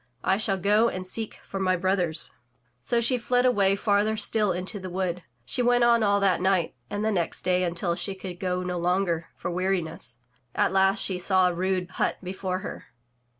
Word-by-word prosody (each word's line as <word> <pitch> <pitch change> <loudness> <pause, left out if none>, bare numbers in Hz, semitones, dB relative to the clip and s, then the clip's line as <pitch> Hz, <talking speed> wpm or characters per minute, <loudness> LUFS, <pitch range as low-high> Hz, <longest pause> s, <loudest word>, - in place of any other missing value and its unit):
I 190 - +2
shall 200 -2 0
go 210 +5 +3
and 185 -3 -5
seek 220 +4 -3
for 195 - -6
my 185 -1 +2
brothers." 180 -3 -1 0.5
So 235 - 0
she 250 +2 +2
fled 245 +2 +1
away 200 -6 +3
farther 210 +1 +1
still 210 -1 +2
into 185 +4 -3
the 185 0 -6
wood. 180 -1 -2 0.2
She 125 - +1
went 245 0 +3
on 235 -1 +4
all 200 -1 +3
that 185 -3 +2
night 185 -3 +1 0.2
and 205 +1 -2
the 220 - +2
next 175 -5 -1
day 180 0 +2
until 170 0 0
she 195 +3 -1
could 185 -2 -8
go 180 -2 -1
no 180 -1 -3
longer 175 -1 0
for - - -4
weariness. 170 -8 -2 0.4
At - - +2
last 195 0 +3
she 185 -2 -1
saw 185 0 +3
a - - -6
mde 185 0 -1
hut - - -1
before 185 0 -3
her. - - -7
190 Hz, 195 wpm, -26 LUFS, 180-205 Hz, 0.5 s, on